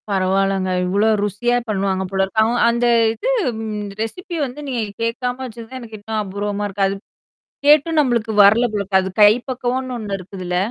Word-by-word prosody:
பரவால்லங்க. 195 0 +1 0.2
இவ்ளோ 200 +4 +1 0.2
ருசியா 240 +5 0
பண்ணுவாங்க 195 -2 0
போலருக்கு. 195 +3 +1
அவ 225 +2 +1 0.2
அந்த 235 +1 +1 0.3
இது 230 - -3 0.7
ரெசிபி 345 - -5
வந்து 260 +2 -8
நீங்க 250 -4 -2 0.2
கேட்காம 245 +2 -2
வச்சது 230 -2 -9
தான் 260 - -7
எனக்கு 225 -2 -9
இன்னும் 215 +1 -3
அபூர்வமா 205 +1 -3
இருக்கு. 195 0 0
அது. 195 - -2 0.7
கேட்டும் 305 +2 +5
நம்மளுக்கு 235 -6 +1
வரல 215 +5 +5
போலருக்கு. 200 -2 +1
அது 190 - -4
கை 205 0 +9 0.2
பக்கவனு 255 0 -2
ஒண்ணு 205 -3 -4
இருக்குதுல்ல? 185 -1 -5
215 Hz, 155 wpm, -20 LUFS, 195-245 Hz, 0.7 s, கை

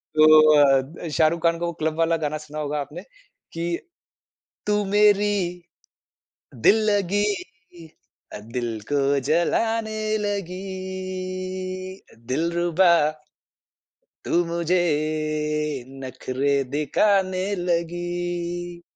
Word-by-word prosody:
तो 155 0 +7
अ, 135 -2 +5
द 160 +4 -8
शाहरुख़ 160 +2 +2
खान 170 0 +2
का 170 - -1
वो 170 - -2
क्लब 155 0 0
वाला 165 0 +3
गाना 155 -1 -2
सुना 150 0 -8
होगा 150 0 -2
आपने 150 +6 -8 0.5
कि 170 +1 -2 0.9
"तू 210 0 +2
मेरी 205 +1 +4 1.2
दिल 125 - +5 0.2
लगी, 205 0 +1 1.3
दिल 120 -3 -2
को 140 0 +2
जलाने 220 +6 +1 0.2
लगी। 185 -1 -5 0.3
दिलरुबा" 170 +5 +2 1.4
"तू - - -3
मुझे 170 +1 0 1.2
नखरे 130 +2 -2 0.2
दिखाने 185 +5 +1
लगी।" 175 0 -3
175 Hz, 90 wpm, -23 LUFS, 155-185 Hz, 1.4 s, तो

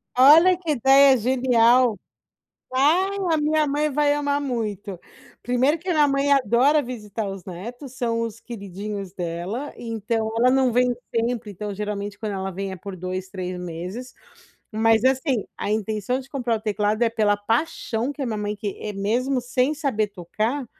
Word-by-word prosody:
Olha, 310 +8 +7
que 345 -3 -3
ideia 270 +1 +6
genial. 245 -2 +3 0.7
Ah, 305 +9 +3 0.3
a - - +3
minha 305 +1 +2
mãe 295 +1 0
vai 295 0 +2
amar 285 -1 0
muito. 210 -8 -4 0.4
Primeiro 255 +6 +2
que 350 - -14
a - - +2
minha 300 -2 +4
mãe 275 +1 +1
adora 275 +3 +4
visitar 220 -4 -5
os 195 -2 -8
netos, 240 - -8
são 230 -2 -1
os 230 -1 -4
queridinhos 200 -3 -7
dela, 180 +10 -4
então 225 -1 -2
ela 245 +2 +4
não 260 -1 +3
vem 250 +1 +2 0.2
sempre, 230 -1 -1
então 205 +2 -5
geralmente 205 0 -4
quando 215 -2 -3
ela 190 0 -3
vem 195 +1 -4
é - - -5
por 195 +1 -8
2, 185 +1 -5
3 185 -2 -5
meses. 180 +8 -6 0.6
Mas, 225 +1 +3
assim, 260 -3 +1
a - - -3
intenção 215 +3 -1
de 265 0 -10
comprar 245 -5 -1
o - - -7
teclado 210 +1 0
é 235 - +4
pela 215 -2 +2
paixão 230 +2 -1
que 290 - -12
a - - -1
minha 220 -2 -2
mãe 210 0 -3
que 210 0 -5
mesmo 245 +7 0
sem 250 +3 0
saber 275 -9 -1
tocar, 215 +8 -3
230 Hz, 170 wpm, -23 LUFS, 205-265 Hz, 0.7 s, Olha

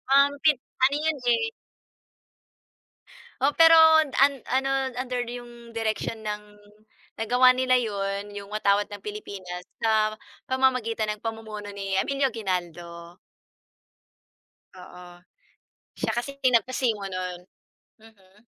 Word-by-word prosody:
um, 280 +1 +6
pe 305 -2 +5 0.3
ano 280 +2 +2
yun 315 -2 0
eh. 450 - +2 1.9
Oo, 280 +2 +3
pero 330 +1 +7 0.2
an 310 - -3 0.4
ano, 265 +1 +1 0.3
under 250 -1 -2
din 245 0 -6
yung 240 - -13 0.2
direksyon 225 -1 -3
ng 210 0 -3 0.8
nagawa 250 +3 +5
nila 255 0 +2
yun, 200 -2 -3
yung 200 0 -8
watawat 205 -1 +1
ng 205 -1 -9
Pilipinas 195 -4 -7 0.2
sa 215 -1 +1 0.3
pamamagitan 255 -4 +1
ng 210 - -14
pamumuno 220 -2 -6
ni 195 -1 -5
Emilio 275 -3 0
Aguinaldo. 175 -4 -5 1.6
Oo. 180 -1 -13 0.7
Siya - - -2
kasi 245 +4 -3
pinagpasimo 245 -4 +1
no'n, 185 -2 -5 0.6
mm. 200 -3 -21
220 Hz, 110 wpm, -25 LUFS, 200-255 Hz, 1.9 s, pero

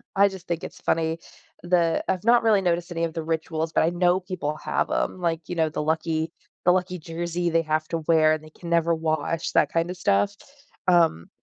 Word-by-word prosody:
I 200 +1 +5
just 190 -2 -11
think 170 -1 -2
it's - - -8
funny. 160 0 0 0.4
The 175 -2 +2
I've 185 0 -1
not 235 +1 +5
really 215 -3 +4
noticed 175 -1 0
any 165 -1 -2
of 165 -1 -1
the 165 -1 -4
rituals 160 0 -2
but - - +3
I 160 - +3
know 175 +1 +2
people 180 -5 -4
have - - 0
‘em. - - -1
Like, 170 -2 -1
you 175 - -3
know, 160 -1 +2
the 155 - -3
lucky 160 +1 -1 0.3
the 180 - +6
lucky 180 0 0
jersey 170 +2 -3
they 165 0 +2
have 155 0 -1
to 165 - -1
wear 160 -2 +5
and 155 - -3
they 155 - -13
can 170 +2 -10
never 170 0 +3
wash, 160 +1 -1
that - - +3
kinda 165 +2 0
stuff. 200 +2 +1 0.5
Um, 165 - +3
170 Hz, 215 wpm, -25 LUFS, 160-180 Hz, 0.5 s, the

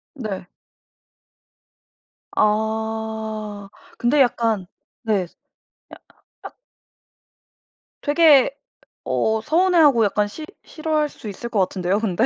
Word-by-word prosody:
네. 200 -8 -6 1.9
아 220 -1 -2 0.3
근데 275 +4 +3
약간 225 -6 +1 0.4
네. 205 -5 +1
스 - - -29 0.6
야 - - -9 0.4
앗 - - -11 1.5
되게 295 -3 +5 0.5
어 220 0 0
서운해하고 315 - +4
약간 205 +1 +1
싫 305 +9 -8 0.2
싫어할 310 -2 -1
수 220 - -11
있을 235 +4 -7
것 215 - -1
같은데요 185 +1 0
근데? 220 +1 +1
220 Hz, 165 characters per minute, -21 LUFS, 210-275 Hz, 1.9 s, 되게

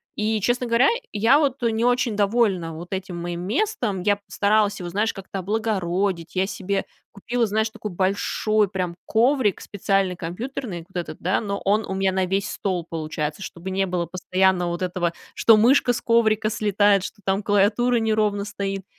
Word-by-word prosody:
И, 215 0 0
честно 245 +3 +1
говоря, 235 +2 +4 0.3
я 225 +6 +4
вот 280 -3 0
не 230 0 +1
очень 245 -2 +1
довольна 200 -5 +1
вот 170 +2 -8
этим 190 -2 -4
моим 170 0 -4
местом. 225 - -1
Я 205 +2 +3
постаралась 205 +1 +1
его, 175 -1 -5
знаешь, 210 +5 0
как-то 195 0 -7
облагородить. 190 -4 -1
Я 190 +1 +1
себе 195 0 -2 0.3
купила, 235 +4 -1
знаешь, 220 +1 0
такой 215 -1 -7
большой 200 +3 +1
прям 185 -3 -3
коврик 235 -2 +2
специальный 195 -2 0
компьютерный, 180 +1 -5
вот 190 - -7
этот, 155 -2 -7
да, 185 +3 +1
но 200 -2 -4
он 210 +2 +2
у - - -4
меня 190 0 +1
на 190 0 0
весь 195 +2 -1
стол 185 -3 -2
получается, 155 +1 -4
чтобы 175 +1 -7
не 195 +1 0
было 175 -2 -2
постоянно 185 +1 +1
вот 170 +1 -4
этого, 175 -2 -1 0.2
что 225 - +6
мышка 245 +3 +4
с 235 - -4
коврика 220 -2 +2
слетает, 205 -2 +2
что 205 - -8
там 195 +2 0
клавиатура 210 +5 +2
неровно 215 -2 +1
стоит. 195 -2 -4
200 Hz, 175 wpm, -23 LUFS, 185-220 Hz, 0.3 s, что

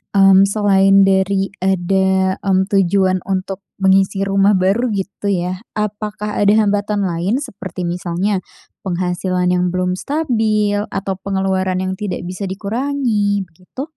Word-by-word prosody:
mmm, 195 0 +6
selain 195 -1 +4
dari 195 0 +1
ada, 190 0 +1
mmm, 190 -1 +1
tujuan 190 -1 +2
untuk 190 0 -2 0.2
mengisi 195 +1 +3
rumah 195 +1 +3
baru 195 +7 +1
gitu 200 +1 -4
ya, 180 -1 -1 0.2
apakah 210 0 -3
ada 205 0 +4
hambatan 205 -1 +1
lain, 180 +5 -1
seperti 190 - -7
misalnya 180 +3 -1 0.4
penghasilan 180 0 -1
yang 180 0 +1
belum 180 0 -1
stabil 220 -9 0
atau 195 0 -3
pengeluaran 190 -1 -1
yang 185 0 -2
tidak 200 -3 -4
bisa 185 +2 -5
dikurangi, 210 -1 -1
begitu? 180 - -10
195 Hz, 125 wpm, -18 LUFS, 185-205 Hz, 0.4 s, mmm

